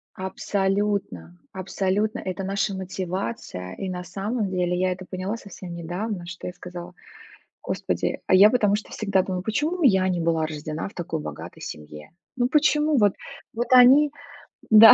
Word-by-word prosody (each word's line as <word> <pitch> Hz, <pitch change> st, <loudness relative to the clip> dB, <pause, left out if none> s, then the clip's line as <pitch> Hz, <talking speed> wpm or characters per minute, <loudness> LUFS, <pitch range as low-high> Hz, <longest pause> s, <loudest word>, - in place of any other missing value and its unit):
Абсолютно 190 Hz, -, -2 dB
абсолютно 195 Hz, +3 st, -1 dB
это 190 Hz, 0 st, -4 dB
наша 195 Hz, +1 st, -1 dB
мотивация, 185 Hz, -, -4 dB
и 190 Hz, -, -4 dB
на 180 Hz, 0 st, -4 dB
самом 200 Hz, +4 st, -2 dB
деле 180 Hz, -1 st, 0 dB
я 185 Hz, 0 st, +2 dB
это 185 Hz, 0 st, -6 dB
поняла 190 Hz, +4 st, -3 dB
совсем 185 Hz, -4 st, -9 dB
недавно, 175 Hz, +3 st, -4 dB
что 175 Hz, 0 st, -8 dB
я 180 Hz, -, -4 dB
сказала: 175 Hz, 0 st, -8 dB
"О -, -, -28 dB, 0.7 s
господи, -, -, -2 dB
а -, -, +5 dB
я 200 Hz, +3 st, +9 dB
потому 210 Hz, -4 st, +3 dB
что 210 Hz, -, -8 dB
всегда 200 Hz, -3 st, +1 dB
думала, 185 Hz, -1 st, -3 dB
почему 305 Hz, -, -1 dB
я 190 Hz, -7 st, +5 dB
не 175 Hz, -2 st, 0 dB
была 165 Hz, -1 st, +1 dB
рождена 155 Hz, +2 st, -5 dB
в -, -, -17 dB
такой 165 Hz, -2 st, -3 dB
богатой -, -, -8 dB
семье?" 75 Hz, 0 st, -9 dB, 0.3 s
Ну 245 Hz, 0 st, +2 dB
почему 300 Hz, 0 st, +3 dB
вот 205 Hz, -2 st, +4 dB, 0.4 s
вот 240 Hz, +2 st, -2 dB
они, 270 Hz, +4 st, +8 dB, 0.6 s
да. 220 Hz, +1 st, +11 dB
190 Hz, 160 wpm, -24 LUFS, 175-215 Hz, 0.7 s, да